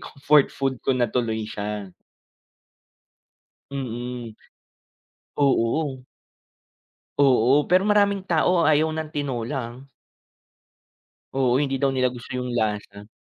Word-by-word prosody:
comfort 145 0 +2
food 135 -2 -3
ko 130 - 0
na 125 - +2
tuloy 110 -3 -1
siya. 105 -2 -5 1.8
Mm, 120 -3 -5 1.0
oo. 135 0 +1 1.2
Oo, 135 +1 +4
pero 185 +1 +4
maraming 200 -1 +2
tao 175 0 +2
ayaw 155 0 +3
ng 155 -1 -4
tinola 135 -2 -3 0.2
ah. 135 +2 -15 1.5
Oo, 130 0 +2
hindi 135 -2 0
daw 135 0 +1
nila 130 -1 +2
gusto 125 0 -9
yung 125 -1 -3
lasa. 105 -2 -3
130 Hz, 105 wpm, -24 LUFS, 120-150 Hz, 1.8 s, Oo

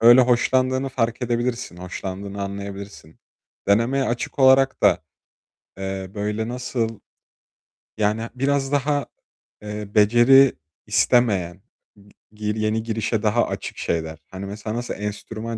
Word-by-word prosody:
Öyle 120 +2 +8
hoşlandığını 130 +2 +2
fark 120 -2 -1
edebilirsin, 120 -4 -2
hoşlandığını 95 +2 -6
anlayabilirsin. 100 -4 -7 0.5
Denemeye 115 +7 +3
açık 120 +2 -3
olarak 135 0 +5
da, - - +5 0.8
eee, 95 -1 -4
böyle 105 +1 -2
nasıl 120 -2 -3 1.0
Yani 105 +1 +1
biraz 135 +1 0
daha, 145 0 +1 0.6
eee, 105 0 -6
beceri 120 +5 +6 0.3
istemeyen, 95 -7 +2 0.3
g 100 0 -20 0.4
gi 110 - -5
yeni 110 +1 0
girişe 110 -1 -1
daha 110 +3 +2
açık - - -5
şeyler. 80 -1 -2
Hani, 95 +1 -7
mesela 105 +2 -5
nasıl 120 0 -3
enstrüman 110 +2 -5
110 Hz, 115 wpm, -23 LUFS, 100-125 Hz, 1.0 s, Öyle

